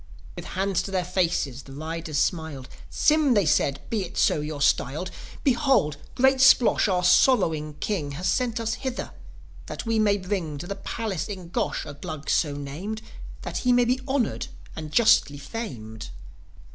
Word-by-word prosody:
With - - -7
hands 195 -1 +1
to - - -6
their 185 -2 -1
faces 170 -7 0
the 135 - -13
riders 160 +1 -4
smiled. 160 -6 -1 0.2
"Sym," 300 -4 +3
they 205 -3 +3
said 140 -2 +2
"be 220 -3 0
it 180 - -8
so 150 - +3
you're 150 -1 -5
styled 145 +4 +1 0.3
Behold, 255 - +2 0.2
great 265 +1 +4
Splosh, 260 -4 +6
our 180 -2 +1
sorrowing 165 - +3
King, 150 -6 -2
Has 180 +6 -3
sent 245 0 0
us 225 -1 -1
hither, 260 -2 -4 0.6
that - - -6
we 225 -1 +1
may 205 -2 +3
bring 185 -6 -3
To 145 - -6
the 200 - -3
palace 200 -3 -4
in 185 -5 -7
Gosh 220 +4 -2
a 145 - -7
Glug 145 +1 -5
so 145 -4 +1
named, 170 +11 -5 0.4
That - - -4
he 250 - +2
may 245 0 +4
be 255 +2 +1
honoured 265 -4 0 0.3
and 155 -1 -6
justly 155 -9 +4
famed." 125 - -7
185 Hz, 170 wpm, -25 LUFS, 150-230 Hz, 0.6 s, Splosh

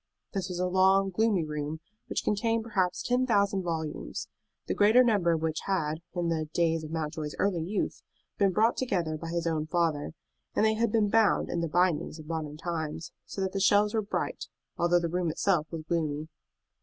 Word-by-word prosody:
This 190 -2 -2
was 180 - -4
a 180 - 0
long, 190 +1 +3
gloomy 210 -2 +2
room, 150 +1 -4 0.3
which - - -2
contained 225 +2 +1
perhaps 185 -5 0
ten 250 +1 +1
thousand 200 -4 +2
volumes, 160 - -4 0.4
the - - -1
greater 220 +5 +6
number 205 -8 +3
of 160 -1 -2
which 160 -1 0
had, 160 -5 0
in 175 -1 0
the 155 -2 -1
days 165 -2 +2
of 155 - -6
Mountjoy's 155 -1 -4
early 190 -4 +1
youth, 190 +5 -2 0.4
been 200 -2 +4
brought 220 +5 +2
together 175 -11 -1
by 165 +2 -6
his 170 0 -2
own 155 -2 -1
father; 160 -3 0 0.4
and - - +3
they 220 - +4
had 225 0 +1
been 215 -2 +2
bound 225 -2 +3
in 170 - -1
the 165 - 0
bindings 175 -2 +1
of 155 - -10
modern 155 -2 -4
times, 160 -1 -4 0.2
so 195 - -5
that 190 -1 0
the 195 - -2
shelves 205 +2 +4
were 220 - +2
bright, 205 - -3 0.3
although 175 +1 +3
the 170 - -1
room 175 0 -1
itself 165 -1 +1
was 165 -2 -6
gloomy. 155 -2 -1
175 Hz, 195 wpm, -29 LUFS, 160-200 Hz, 0.4 s, greater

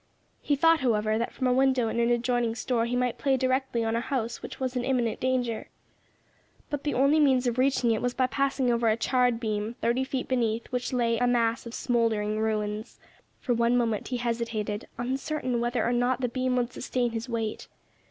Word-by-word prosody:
He 290 - +1
thought, 325 +3 +4
however, 215 -3 +1
that 235 - -2
from 260 - -3
a 250 - +3
window 260 -2 +3
in 225 - -2
an 235 0 +2
adjoining 240 -1 +1
store 235 0 0
he 245 - -1
might 250 -1 0
play 270 -2 +2
directly 260 -2 0
on 225 0 0
a - - +1
house 240 -3 -3
which - - -8
was 260 -1 -2
in 250 - -1
imminent 245 -3 0
danger. 250 -3 -1 1.0
But 290 -1 -3
the 295 - 0
only 275 +4 +4
means 265 -4 +4
of 240 0 0
reaching 260 -3 +2
it 220 - 0
was 245 0 -1
by 260 - +2
passing 270 -1 0
over 235 -1 +2
a 220 - +2
charred 245 0 +2
beam, 215 0 -2
thirty 240 +3 +1
feet 265 -1 -3
beneath 230 -3 0
which 250 0 -2
lay 235 -2 +1
a 245 - +2
mass 235 -1 +1
of 235 - -7
smouldering 220 -3 0
ruins. 215 0 -2 0.4
For 245 - 0
one 235 +1 +2
moment 225 -3 0
he 250 - -2
hesitated, 230 -3 -3
uncertain 255 0 -2
whether 240 +1 0
or 240 - +1
not 245 +1 +1
the 250 - 0
beam 255 +1 -1
would 245 0 -1
sustain 245 -1 -1
his 225 +2 -5
weight. 225 -2 -3
245 Hz, 205 wpm, -27 LUFS, 230-255 Hz, 1.0 s, thought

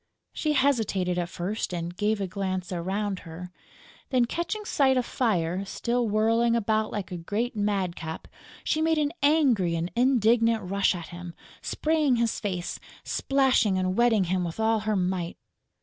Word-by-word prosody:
She 305 -1 0
hesitated 220 -10 +1
at 175 -1 -2
first 190 +5 -3
and 175 0 -4
gave 210 +2 0
a 195 - -1
glance 185 -1 -3
around 190 +3 -2
her; 175 +1 -9 0.6
then, 255 -3 +3
catching 345 - -3
sight 265 -7 +3
of 250 - +1
Fire 185 -8 0
still 235 +4 -1
whirling 230 +2 +2
about 220 -1 0
like 200 -3 -4
a 180 - -3
great 215 +8 -2
madcap, 190 -6 -2 0.4
she 315 - 0
made 320 0 +2
an 300 0 0
angry 265 - +3
and 165 +2 -2
indignant 230 -2 +3
rush 200 0 +2
at 170 -2 -7
him, 175 -1 -8 0.3
spraying 305 -4 +1
his 230 -1 0
face, 185 -4 -3 0.2
splashing 265 -8 +2
and 185 0 0
wetting 235 -3 +4
him 180 +1 0
with 170 +3 -5
all 220 0 +2
her 215 0 -1
might. 180 -2 -1
210 Hz, 160 wpm, -27 LUFS, 180-240 Hz, 0.6 s, wetting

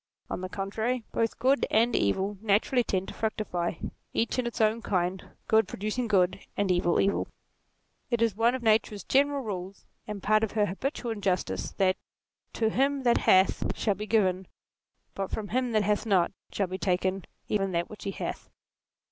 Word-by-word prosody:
On - - -3
the 185 - -4
contrary, 220 +6 -2
both 230 -1 0
good 260 +2 +2
and 230 +3 +3
evil 190 - 0
naturally 220 +4 +2
tend 190 -3 -2
to - - -7
fructify, 205 -6 -2 0.4
each 230 +2 0
in 245 - 0
its 235 - -5
own 220 +1 +2
kind, 185 -3 -1 0.2
good 220 0 +4
producing 215 +4 -2
good, 185 -4 +2 0.2
and 200 -2 +2
evil, 175 -1 +2
evil. 200 - +1 0.8
It 235 - +1
is 230 -4 +2
one 230 +3 +3
of 255 - -5
Nature's 215 -2 +2
general 280 0 +2
rules, 195 -3 -6 0.2
and 210 -2 -6
part 215 +1 +3
of 220 - -1
her 210 -1 +3
habitual 240 - -3
injustice, 195 -4 -1
that 185 -1 +2 0.3
" - - -49
to 220 -1 +1
him 275 +2 +1
that 240 -1 +4
hath 190 0 +3
shall 210 - +1
be 210 +3 -6
given, 190 -4 +2 0.7
but 195 -1 -3
from 210 -2 -4
him 250 +1 0
that 215 -1 +3
hath 210 +3 0
not, 190 -5 +3 0.2
shall 200 - 0
be 185 +1 -5
taken 185 0 0 0.2
even 195 -2 0
that 170 0 0
which 210 - -11
he - - -1
hath." - - -5
210 Hz, 180 wpm, -28 LUFS, 190-230 Hz, 0.8 s, good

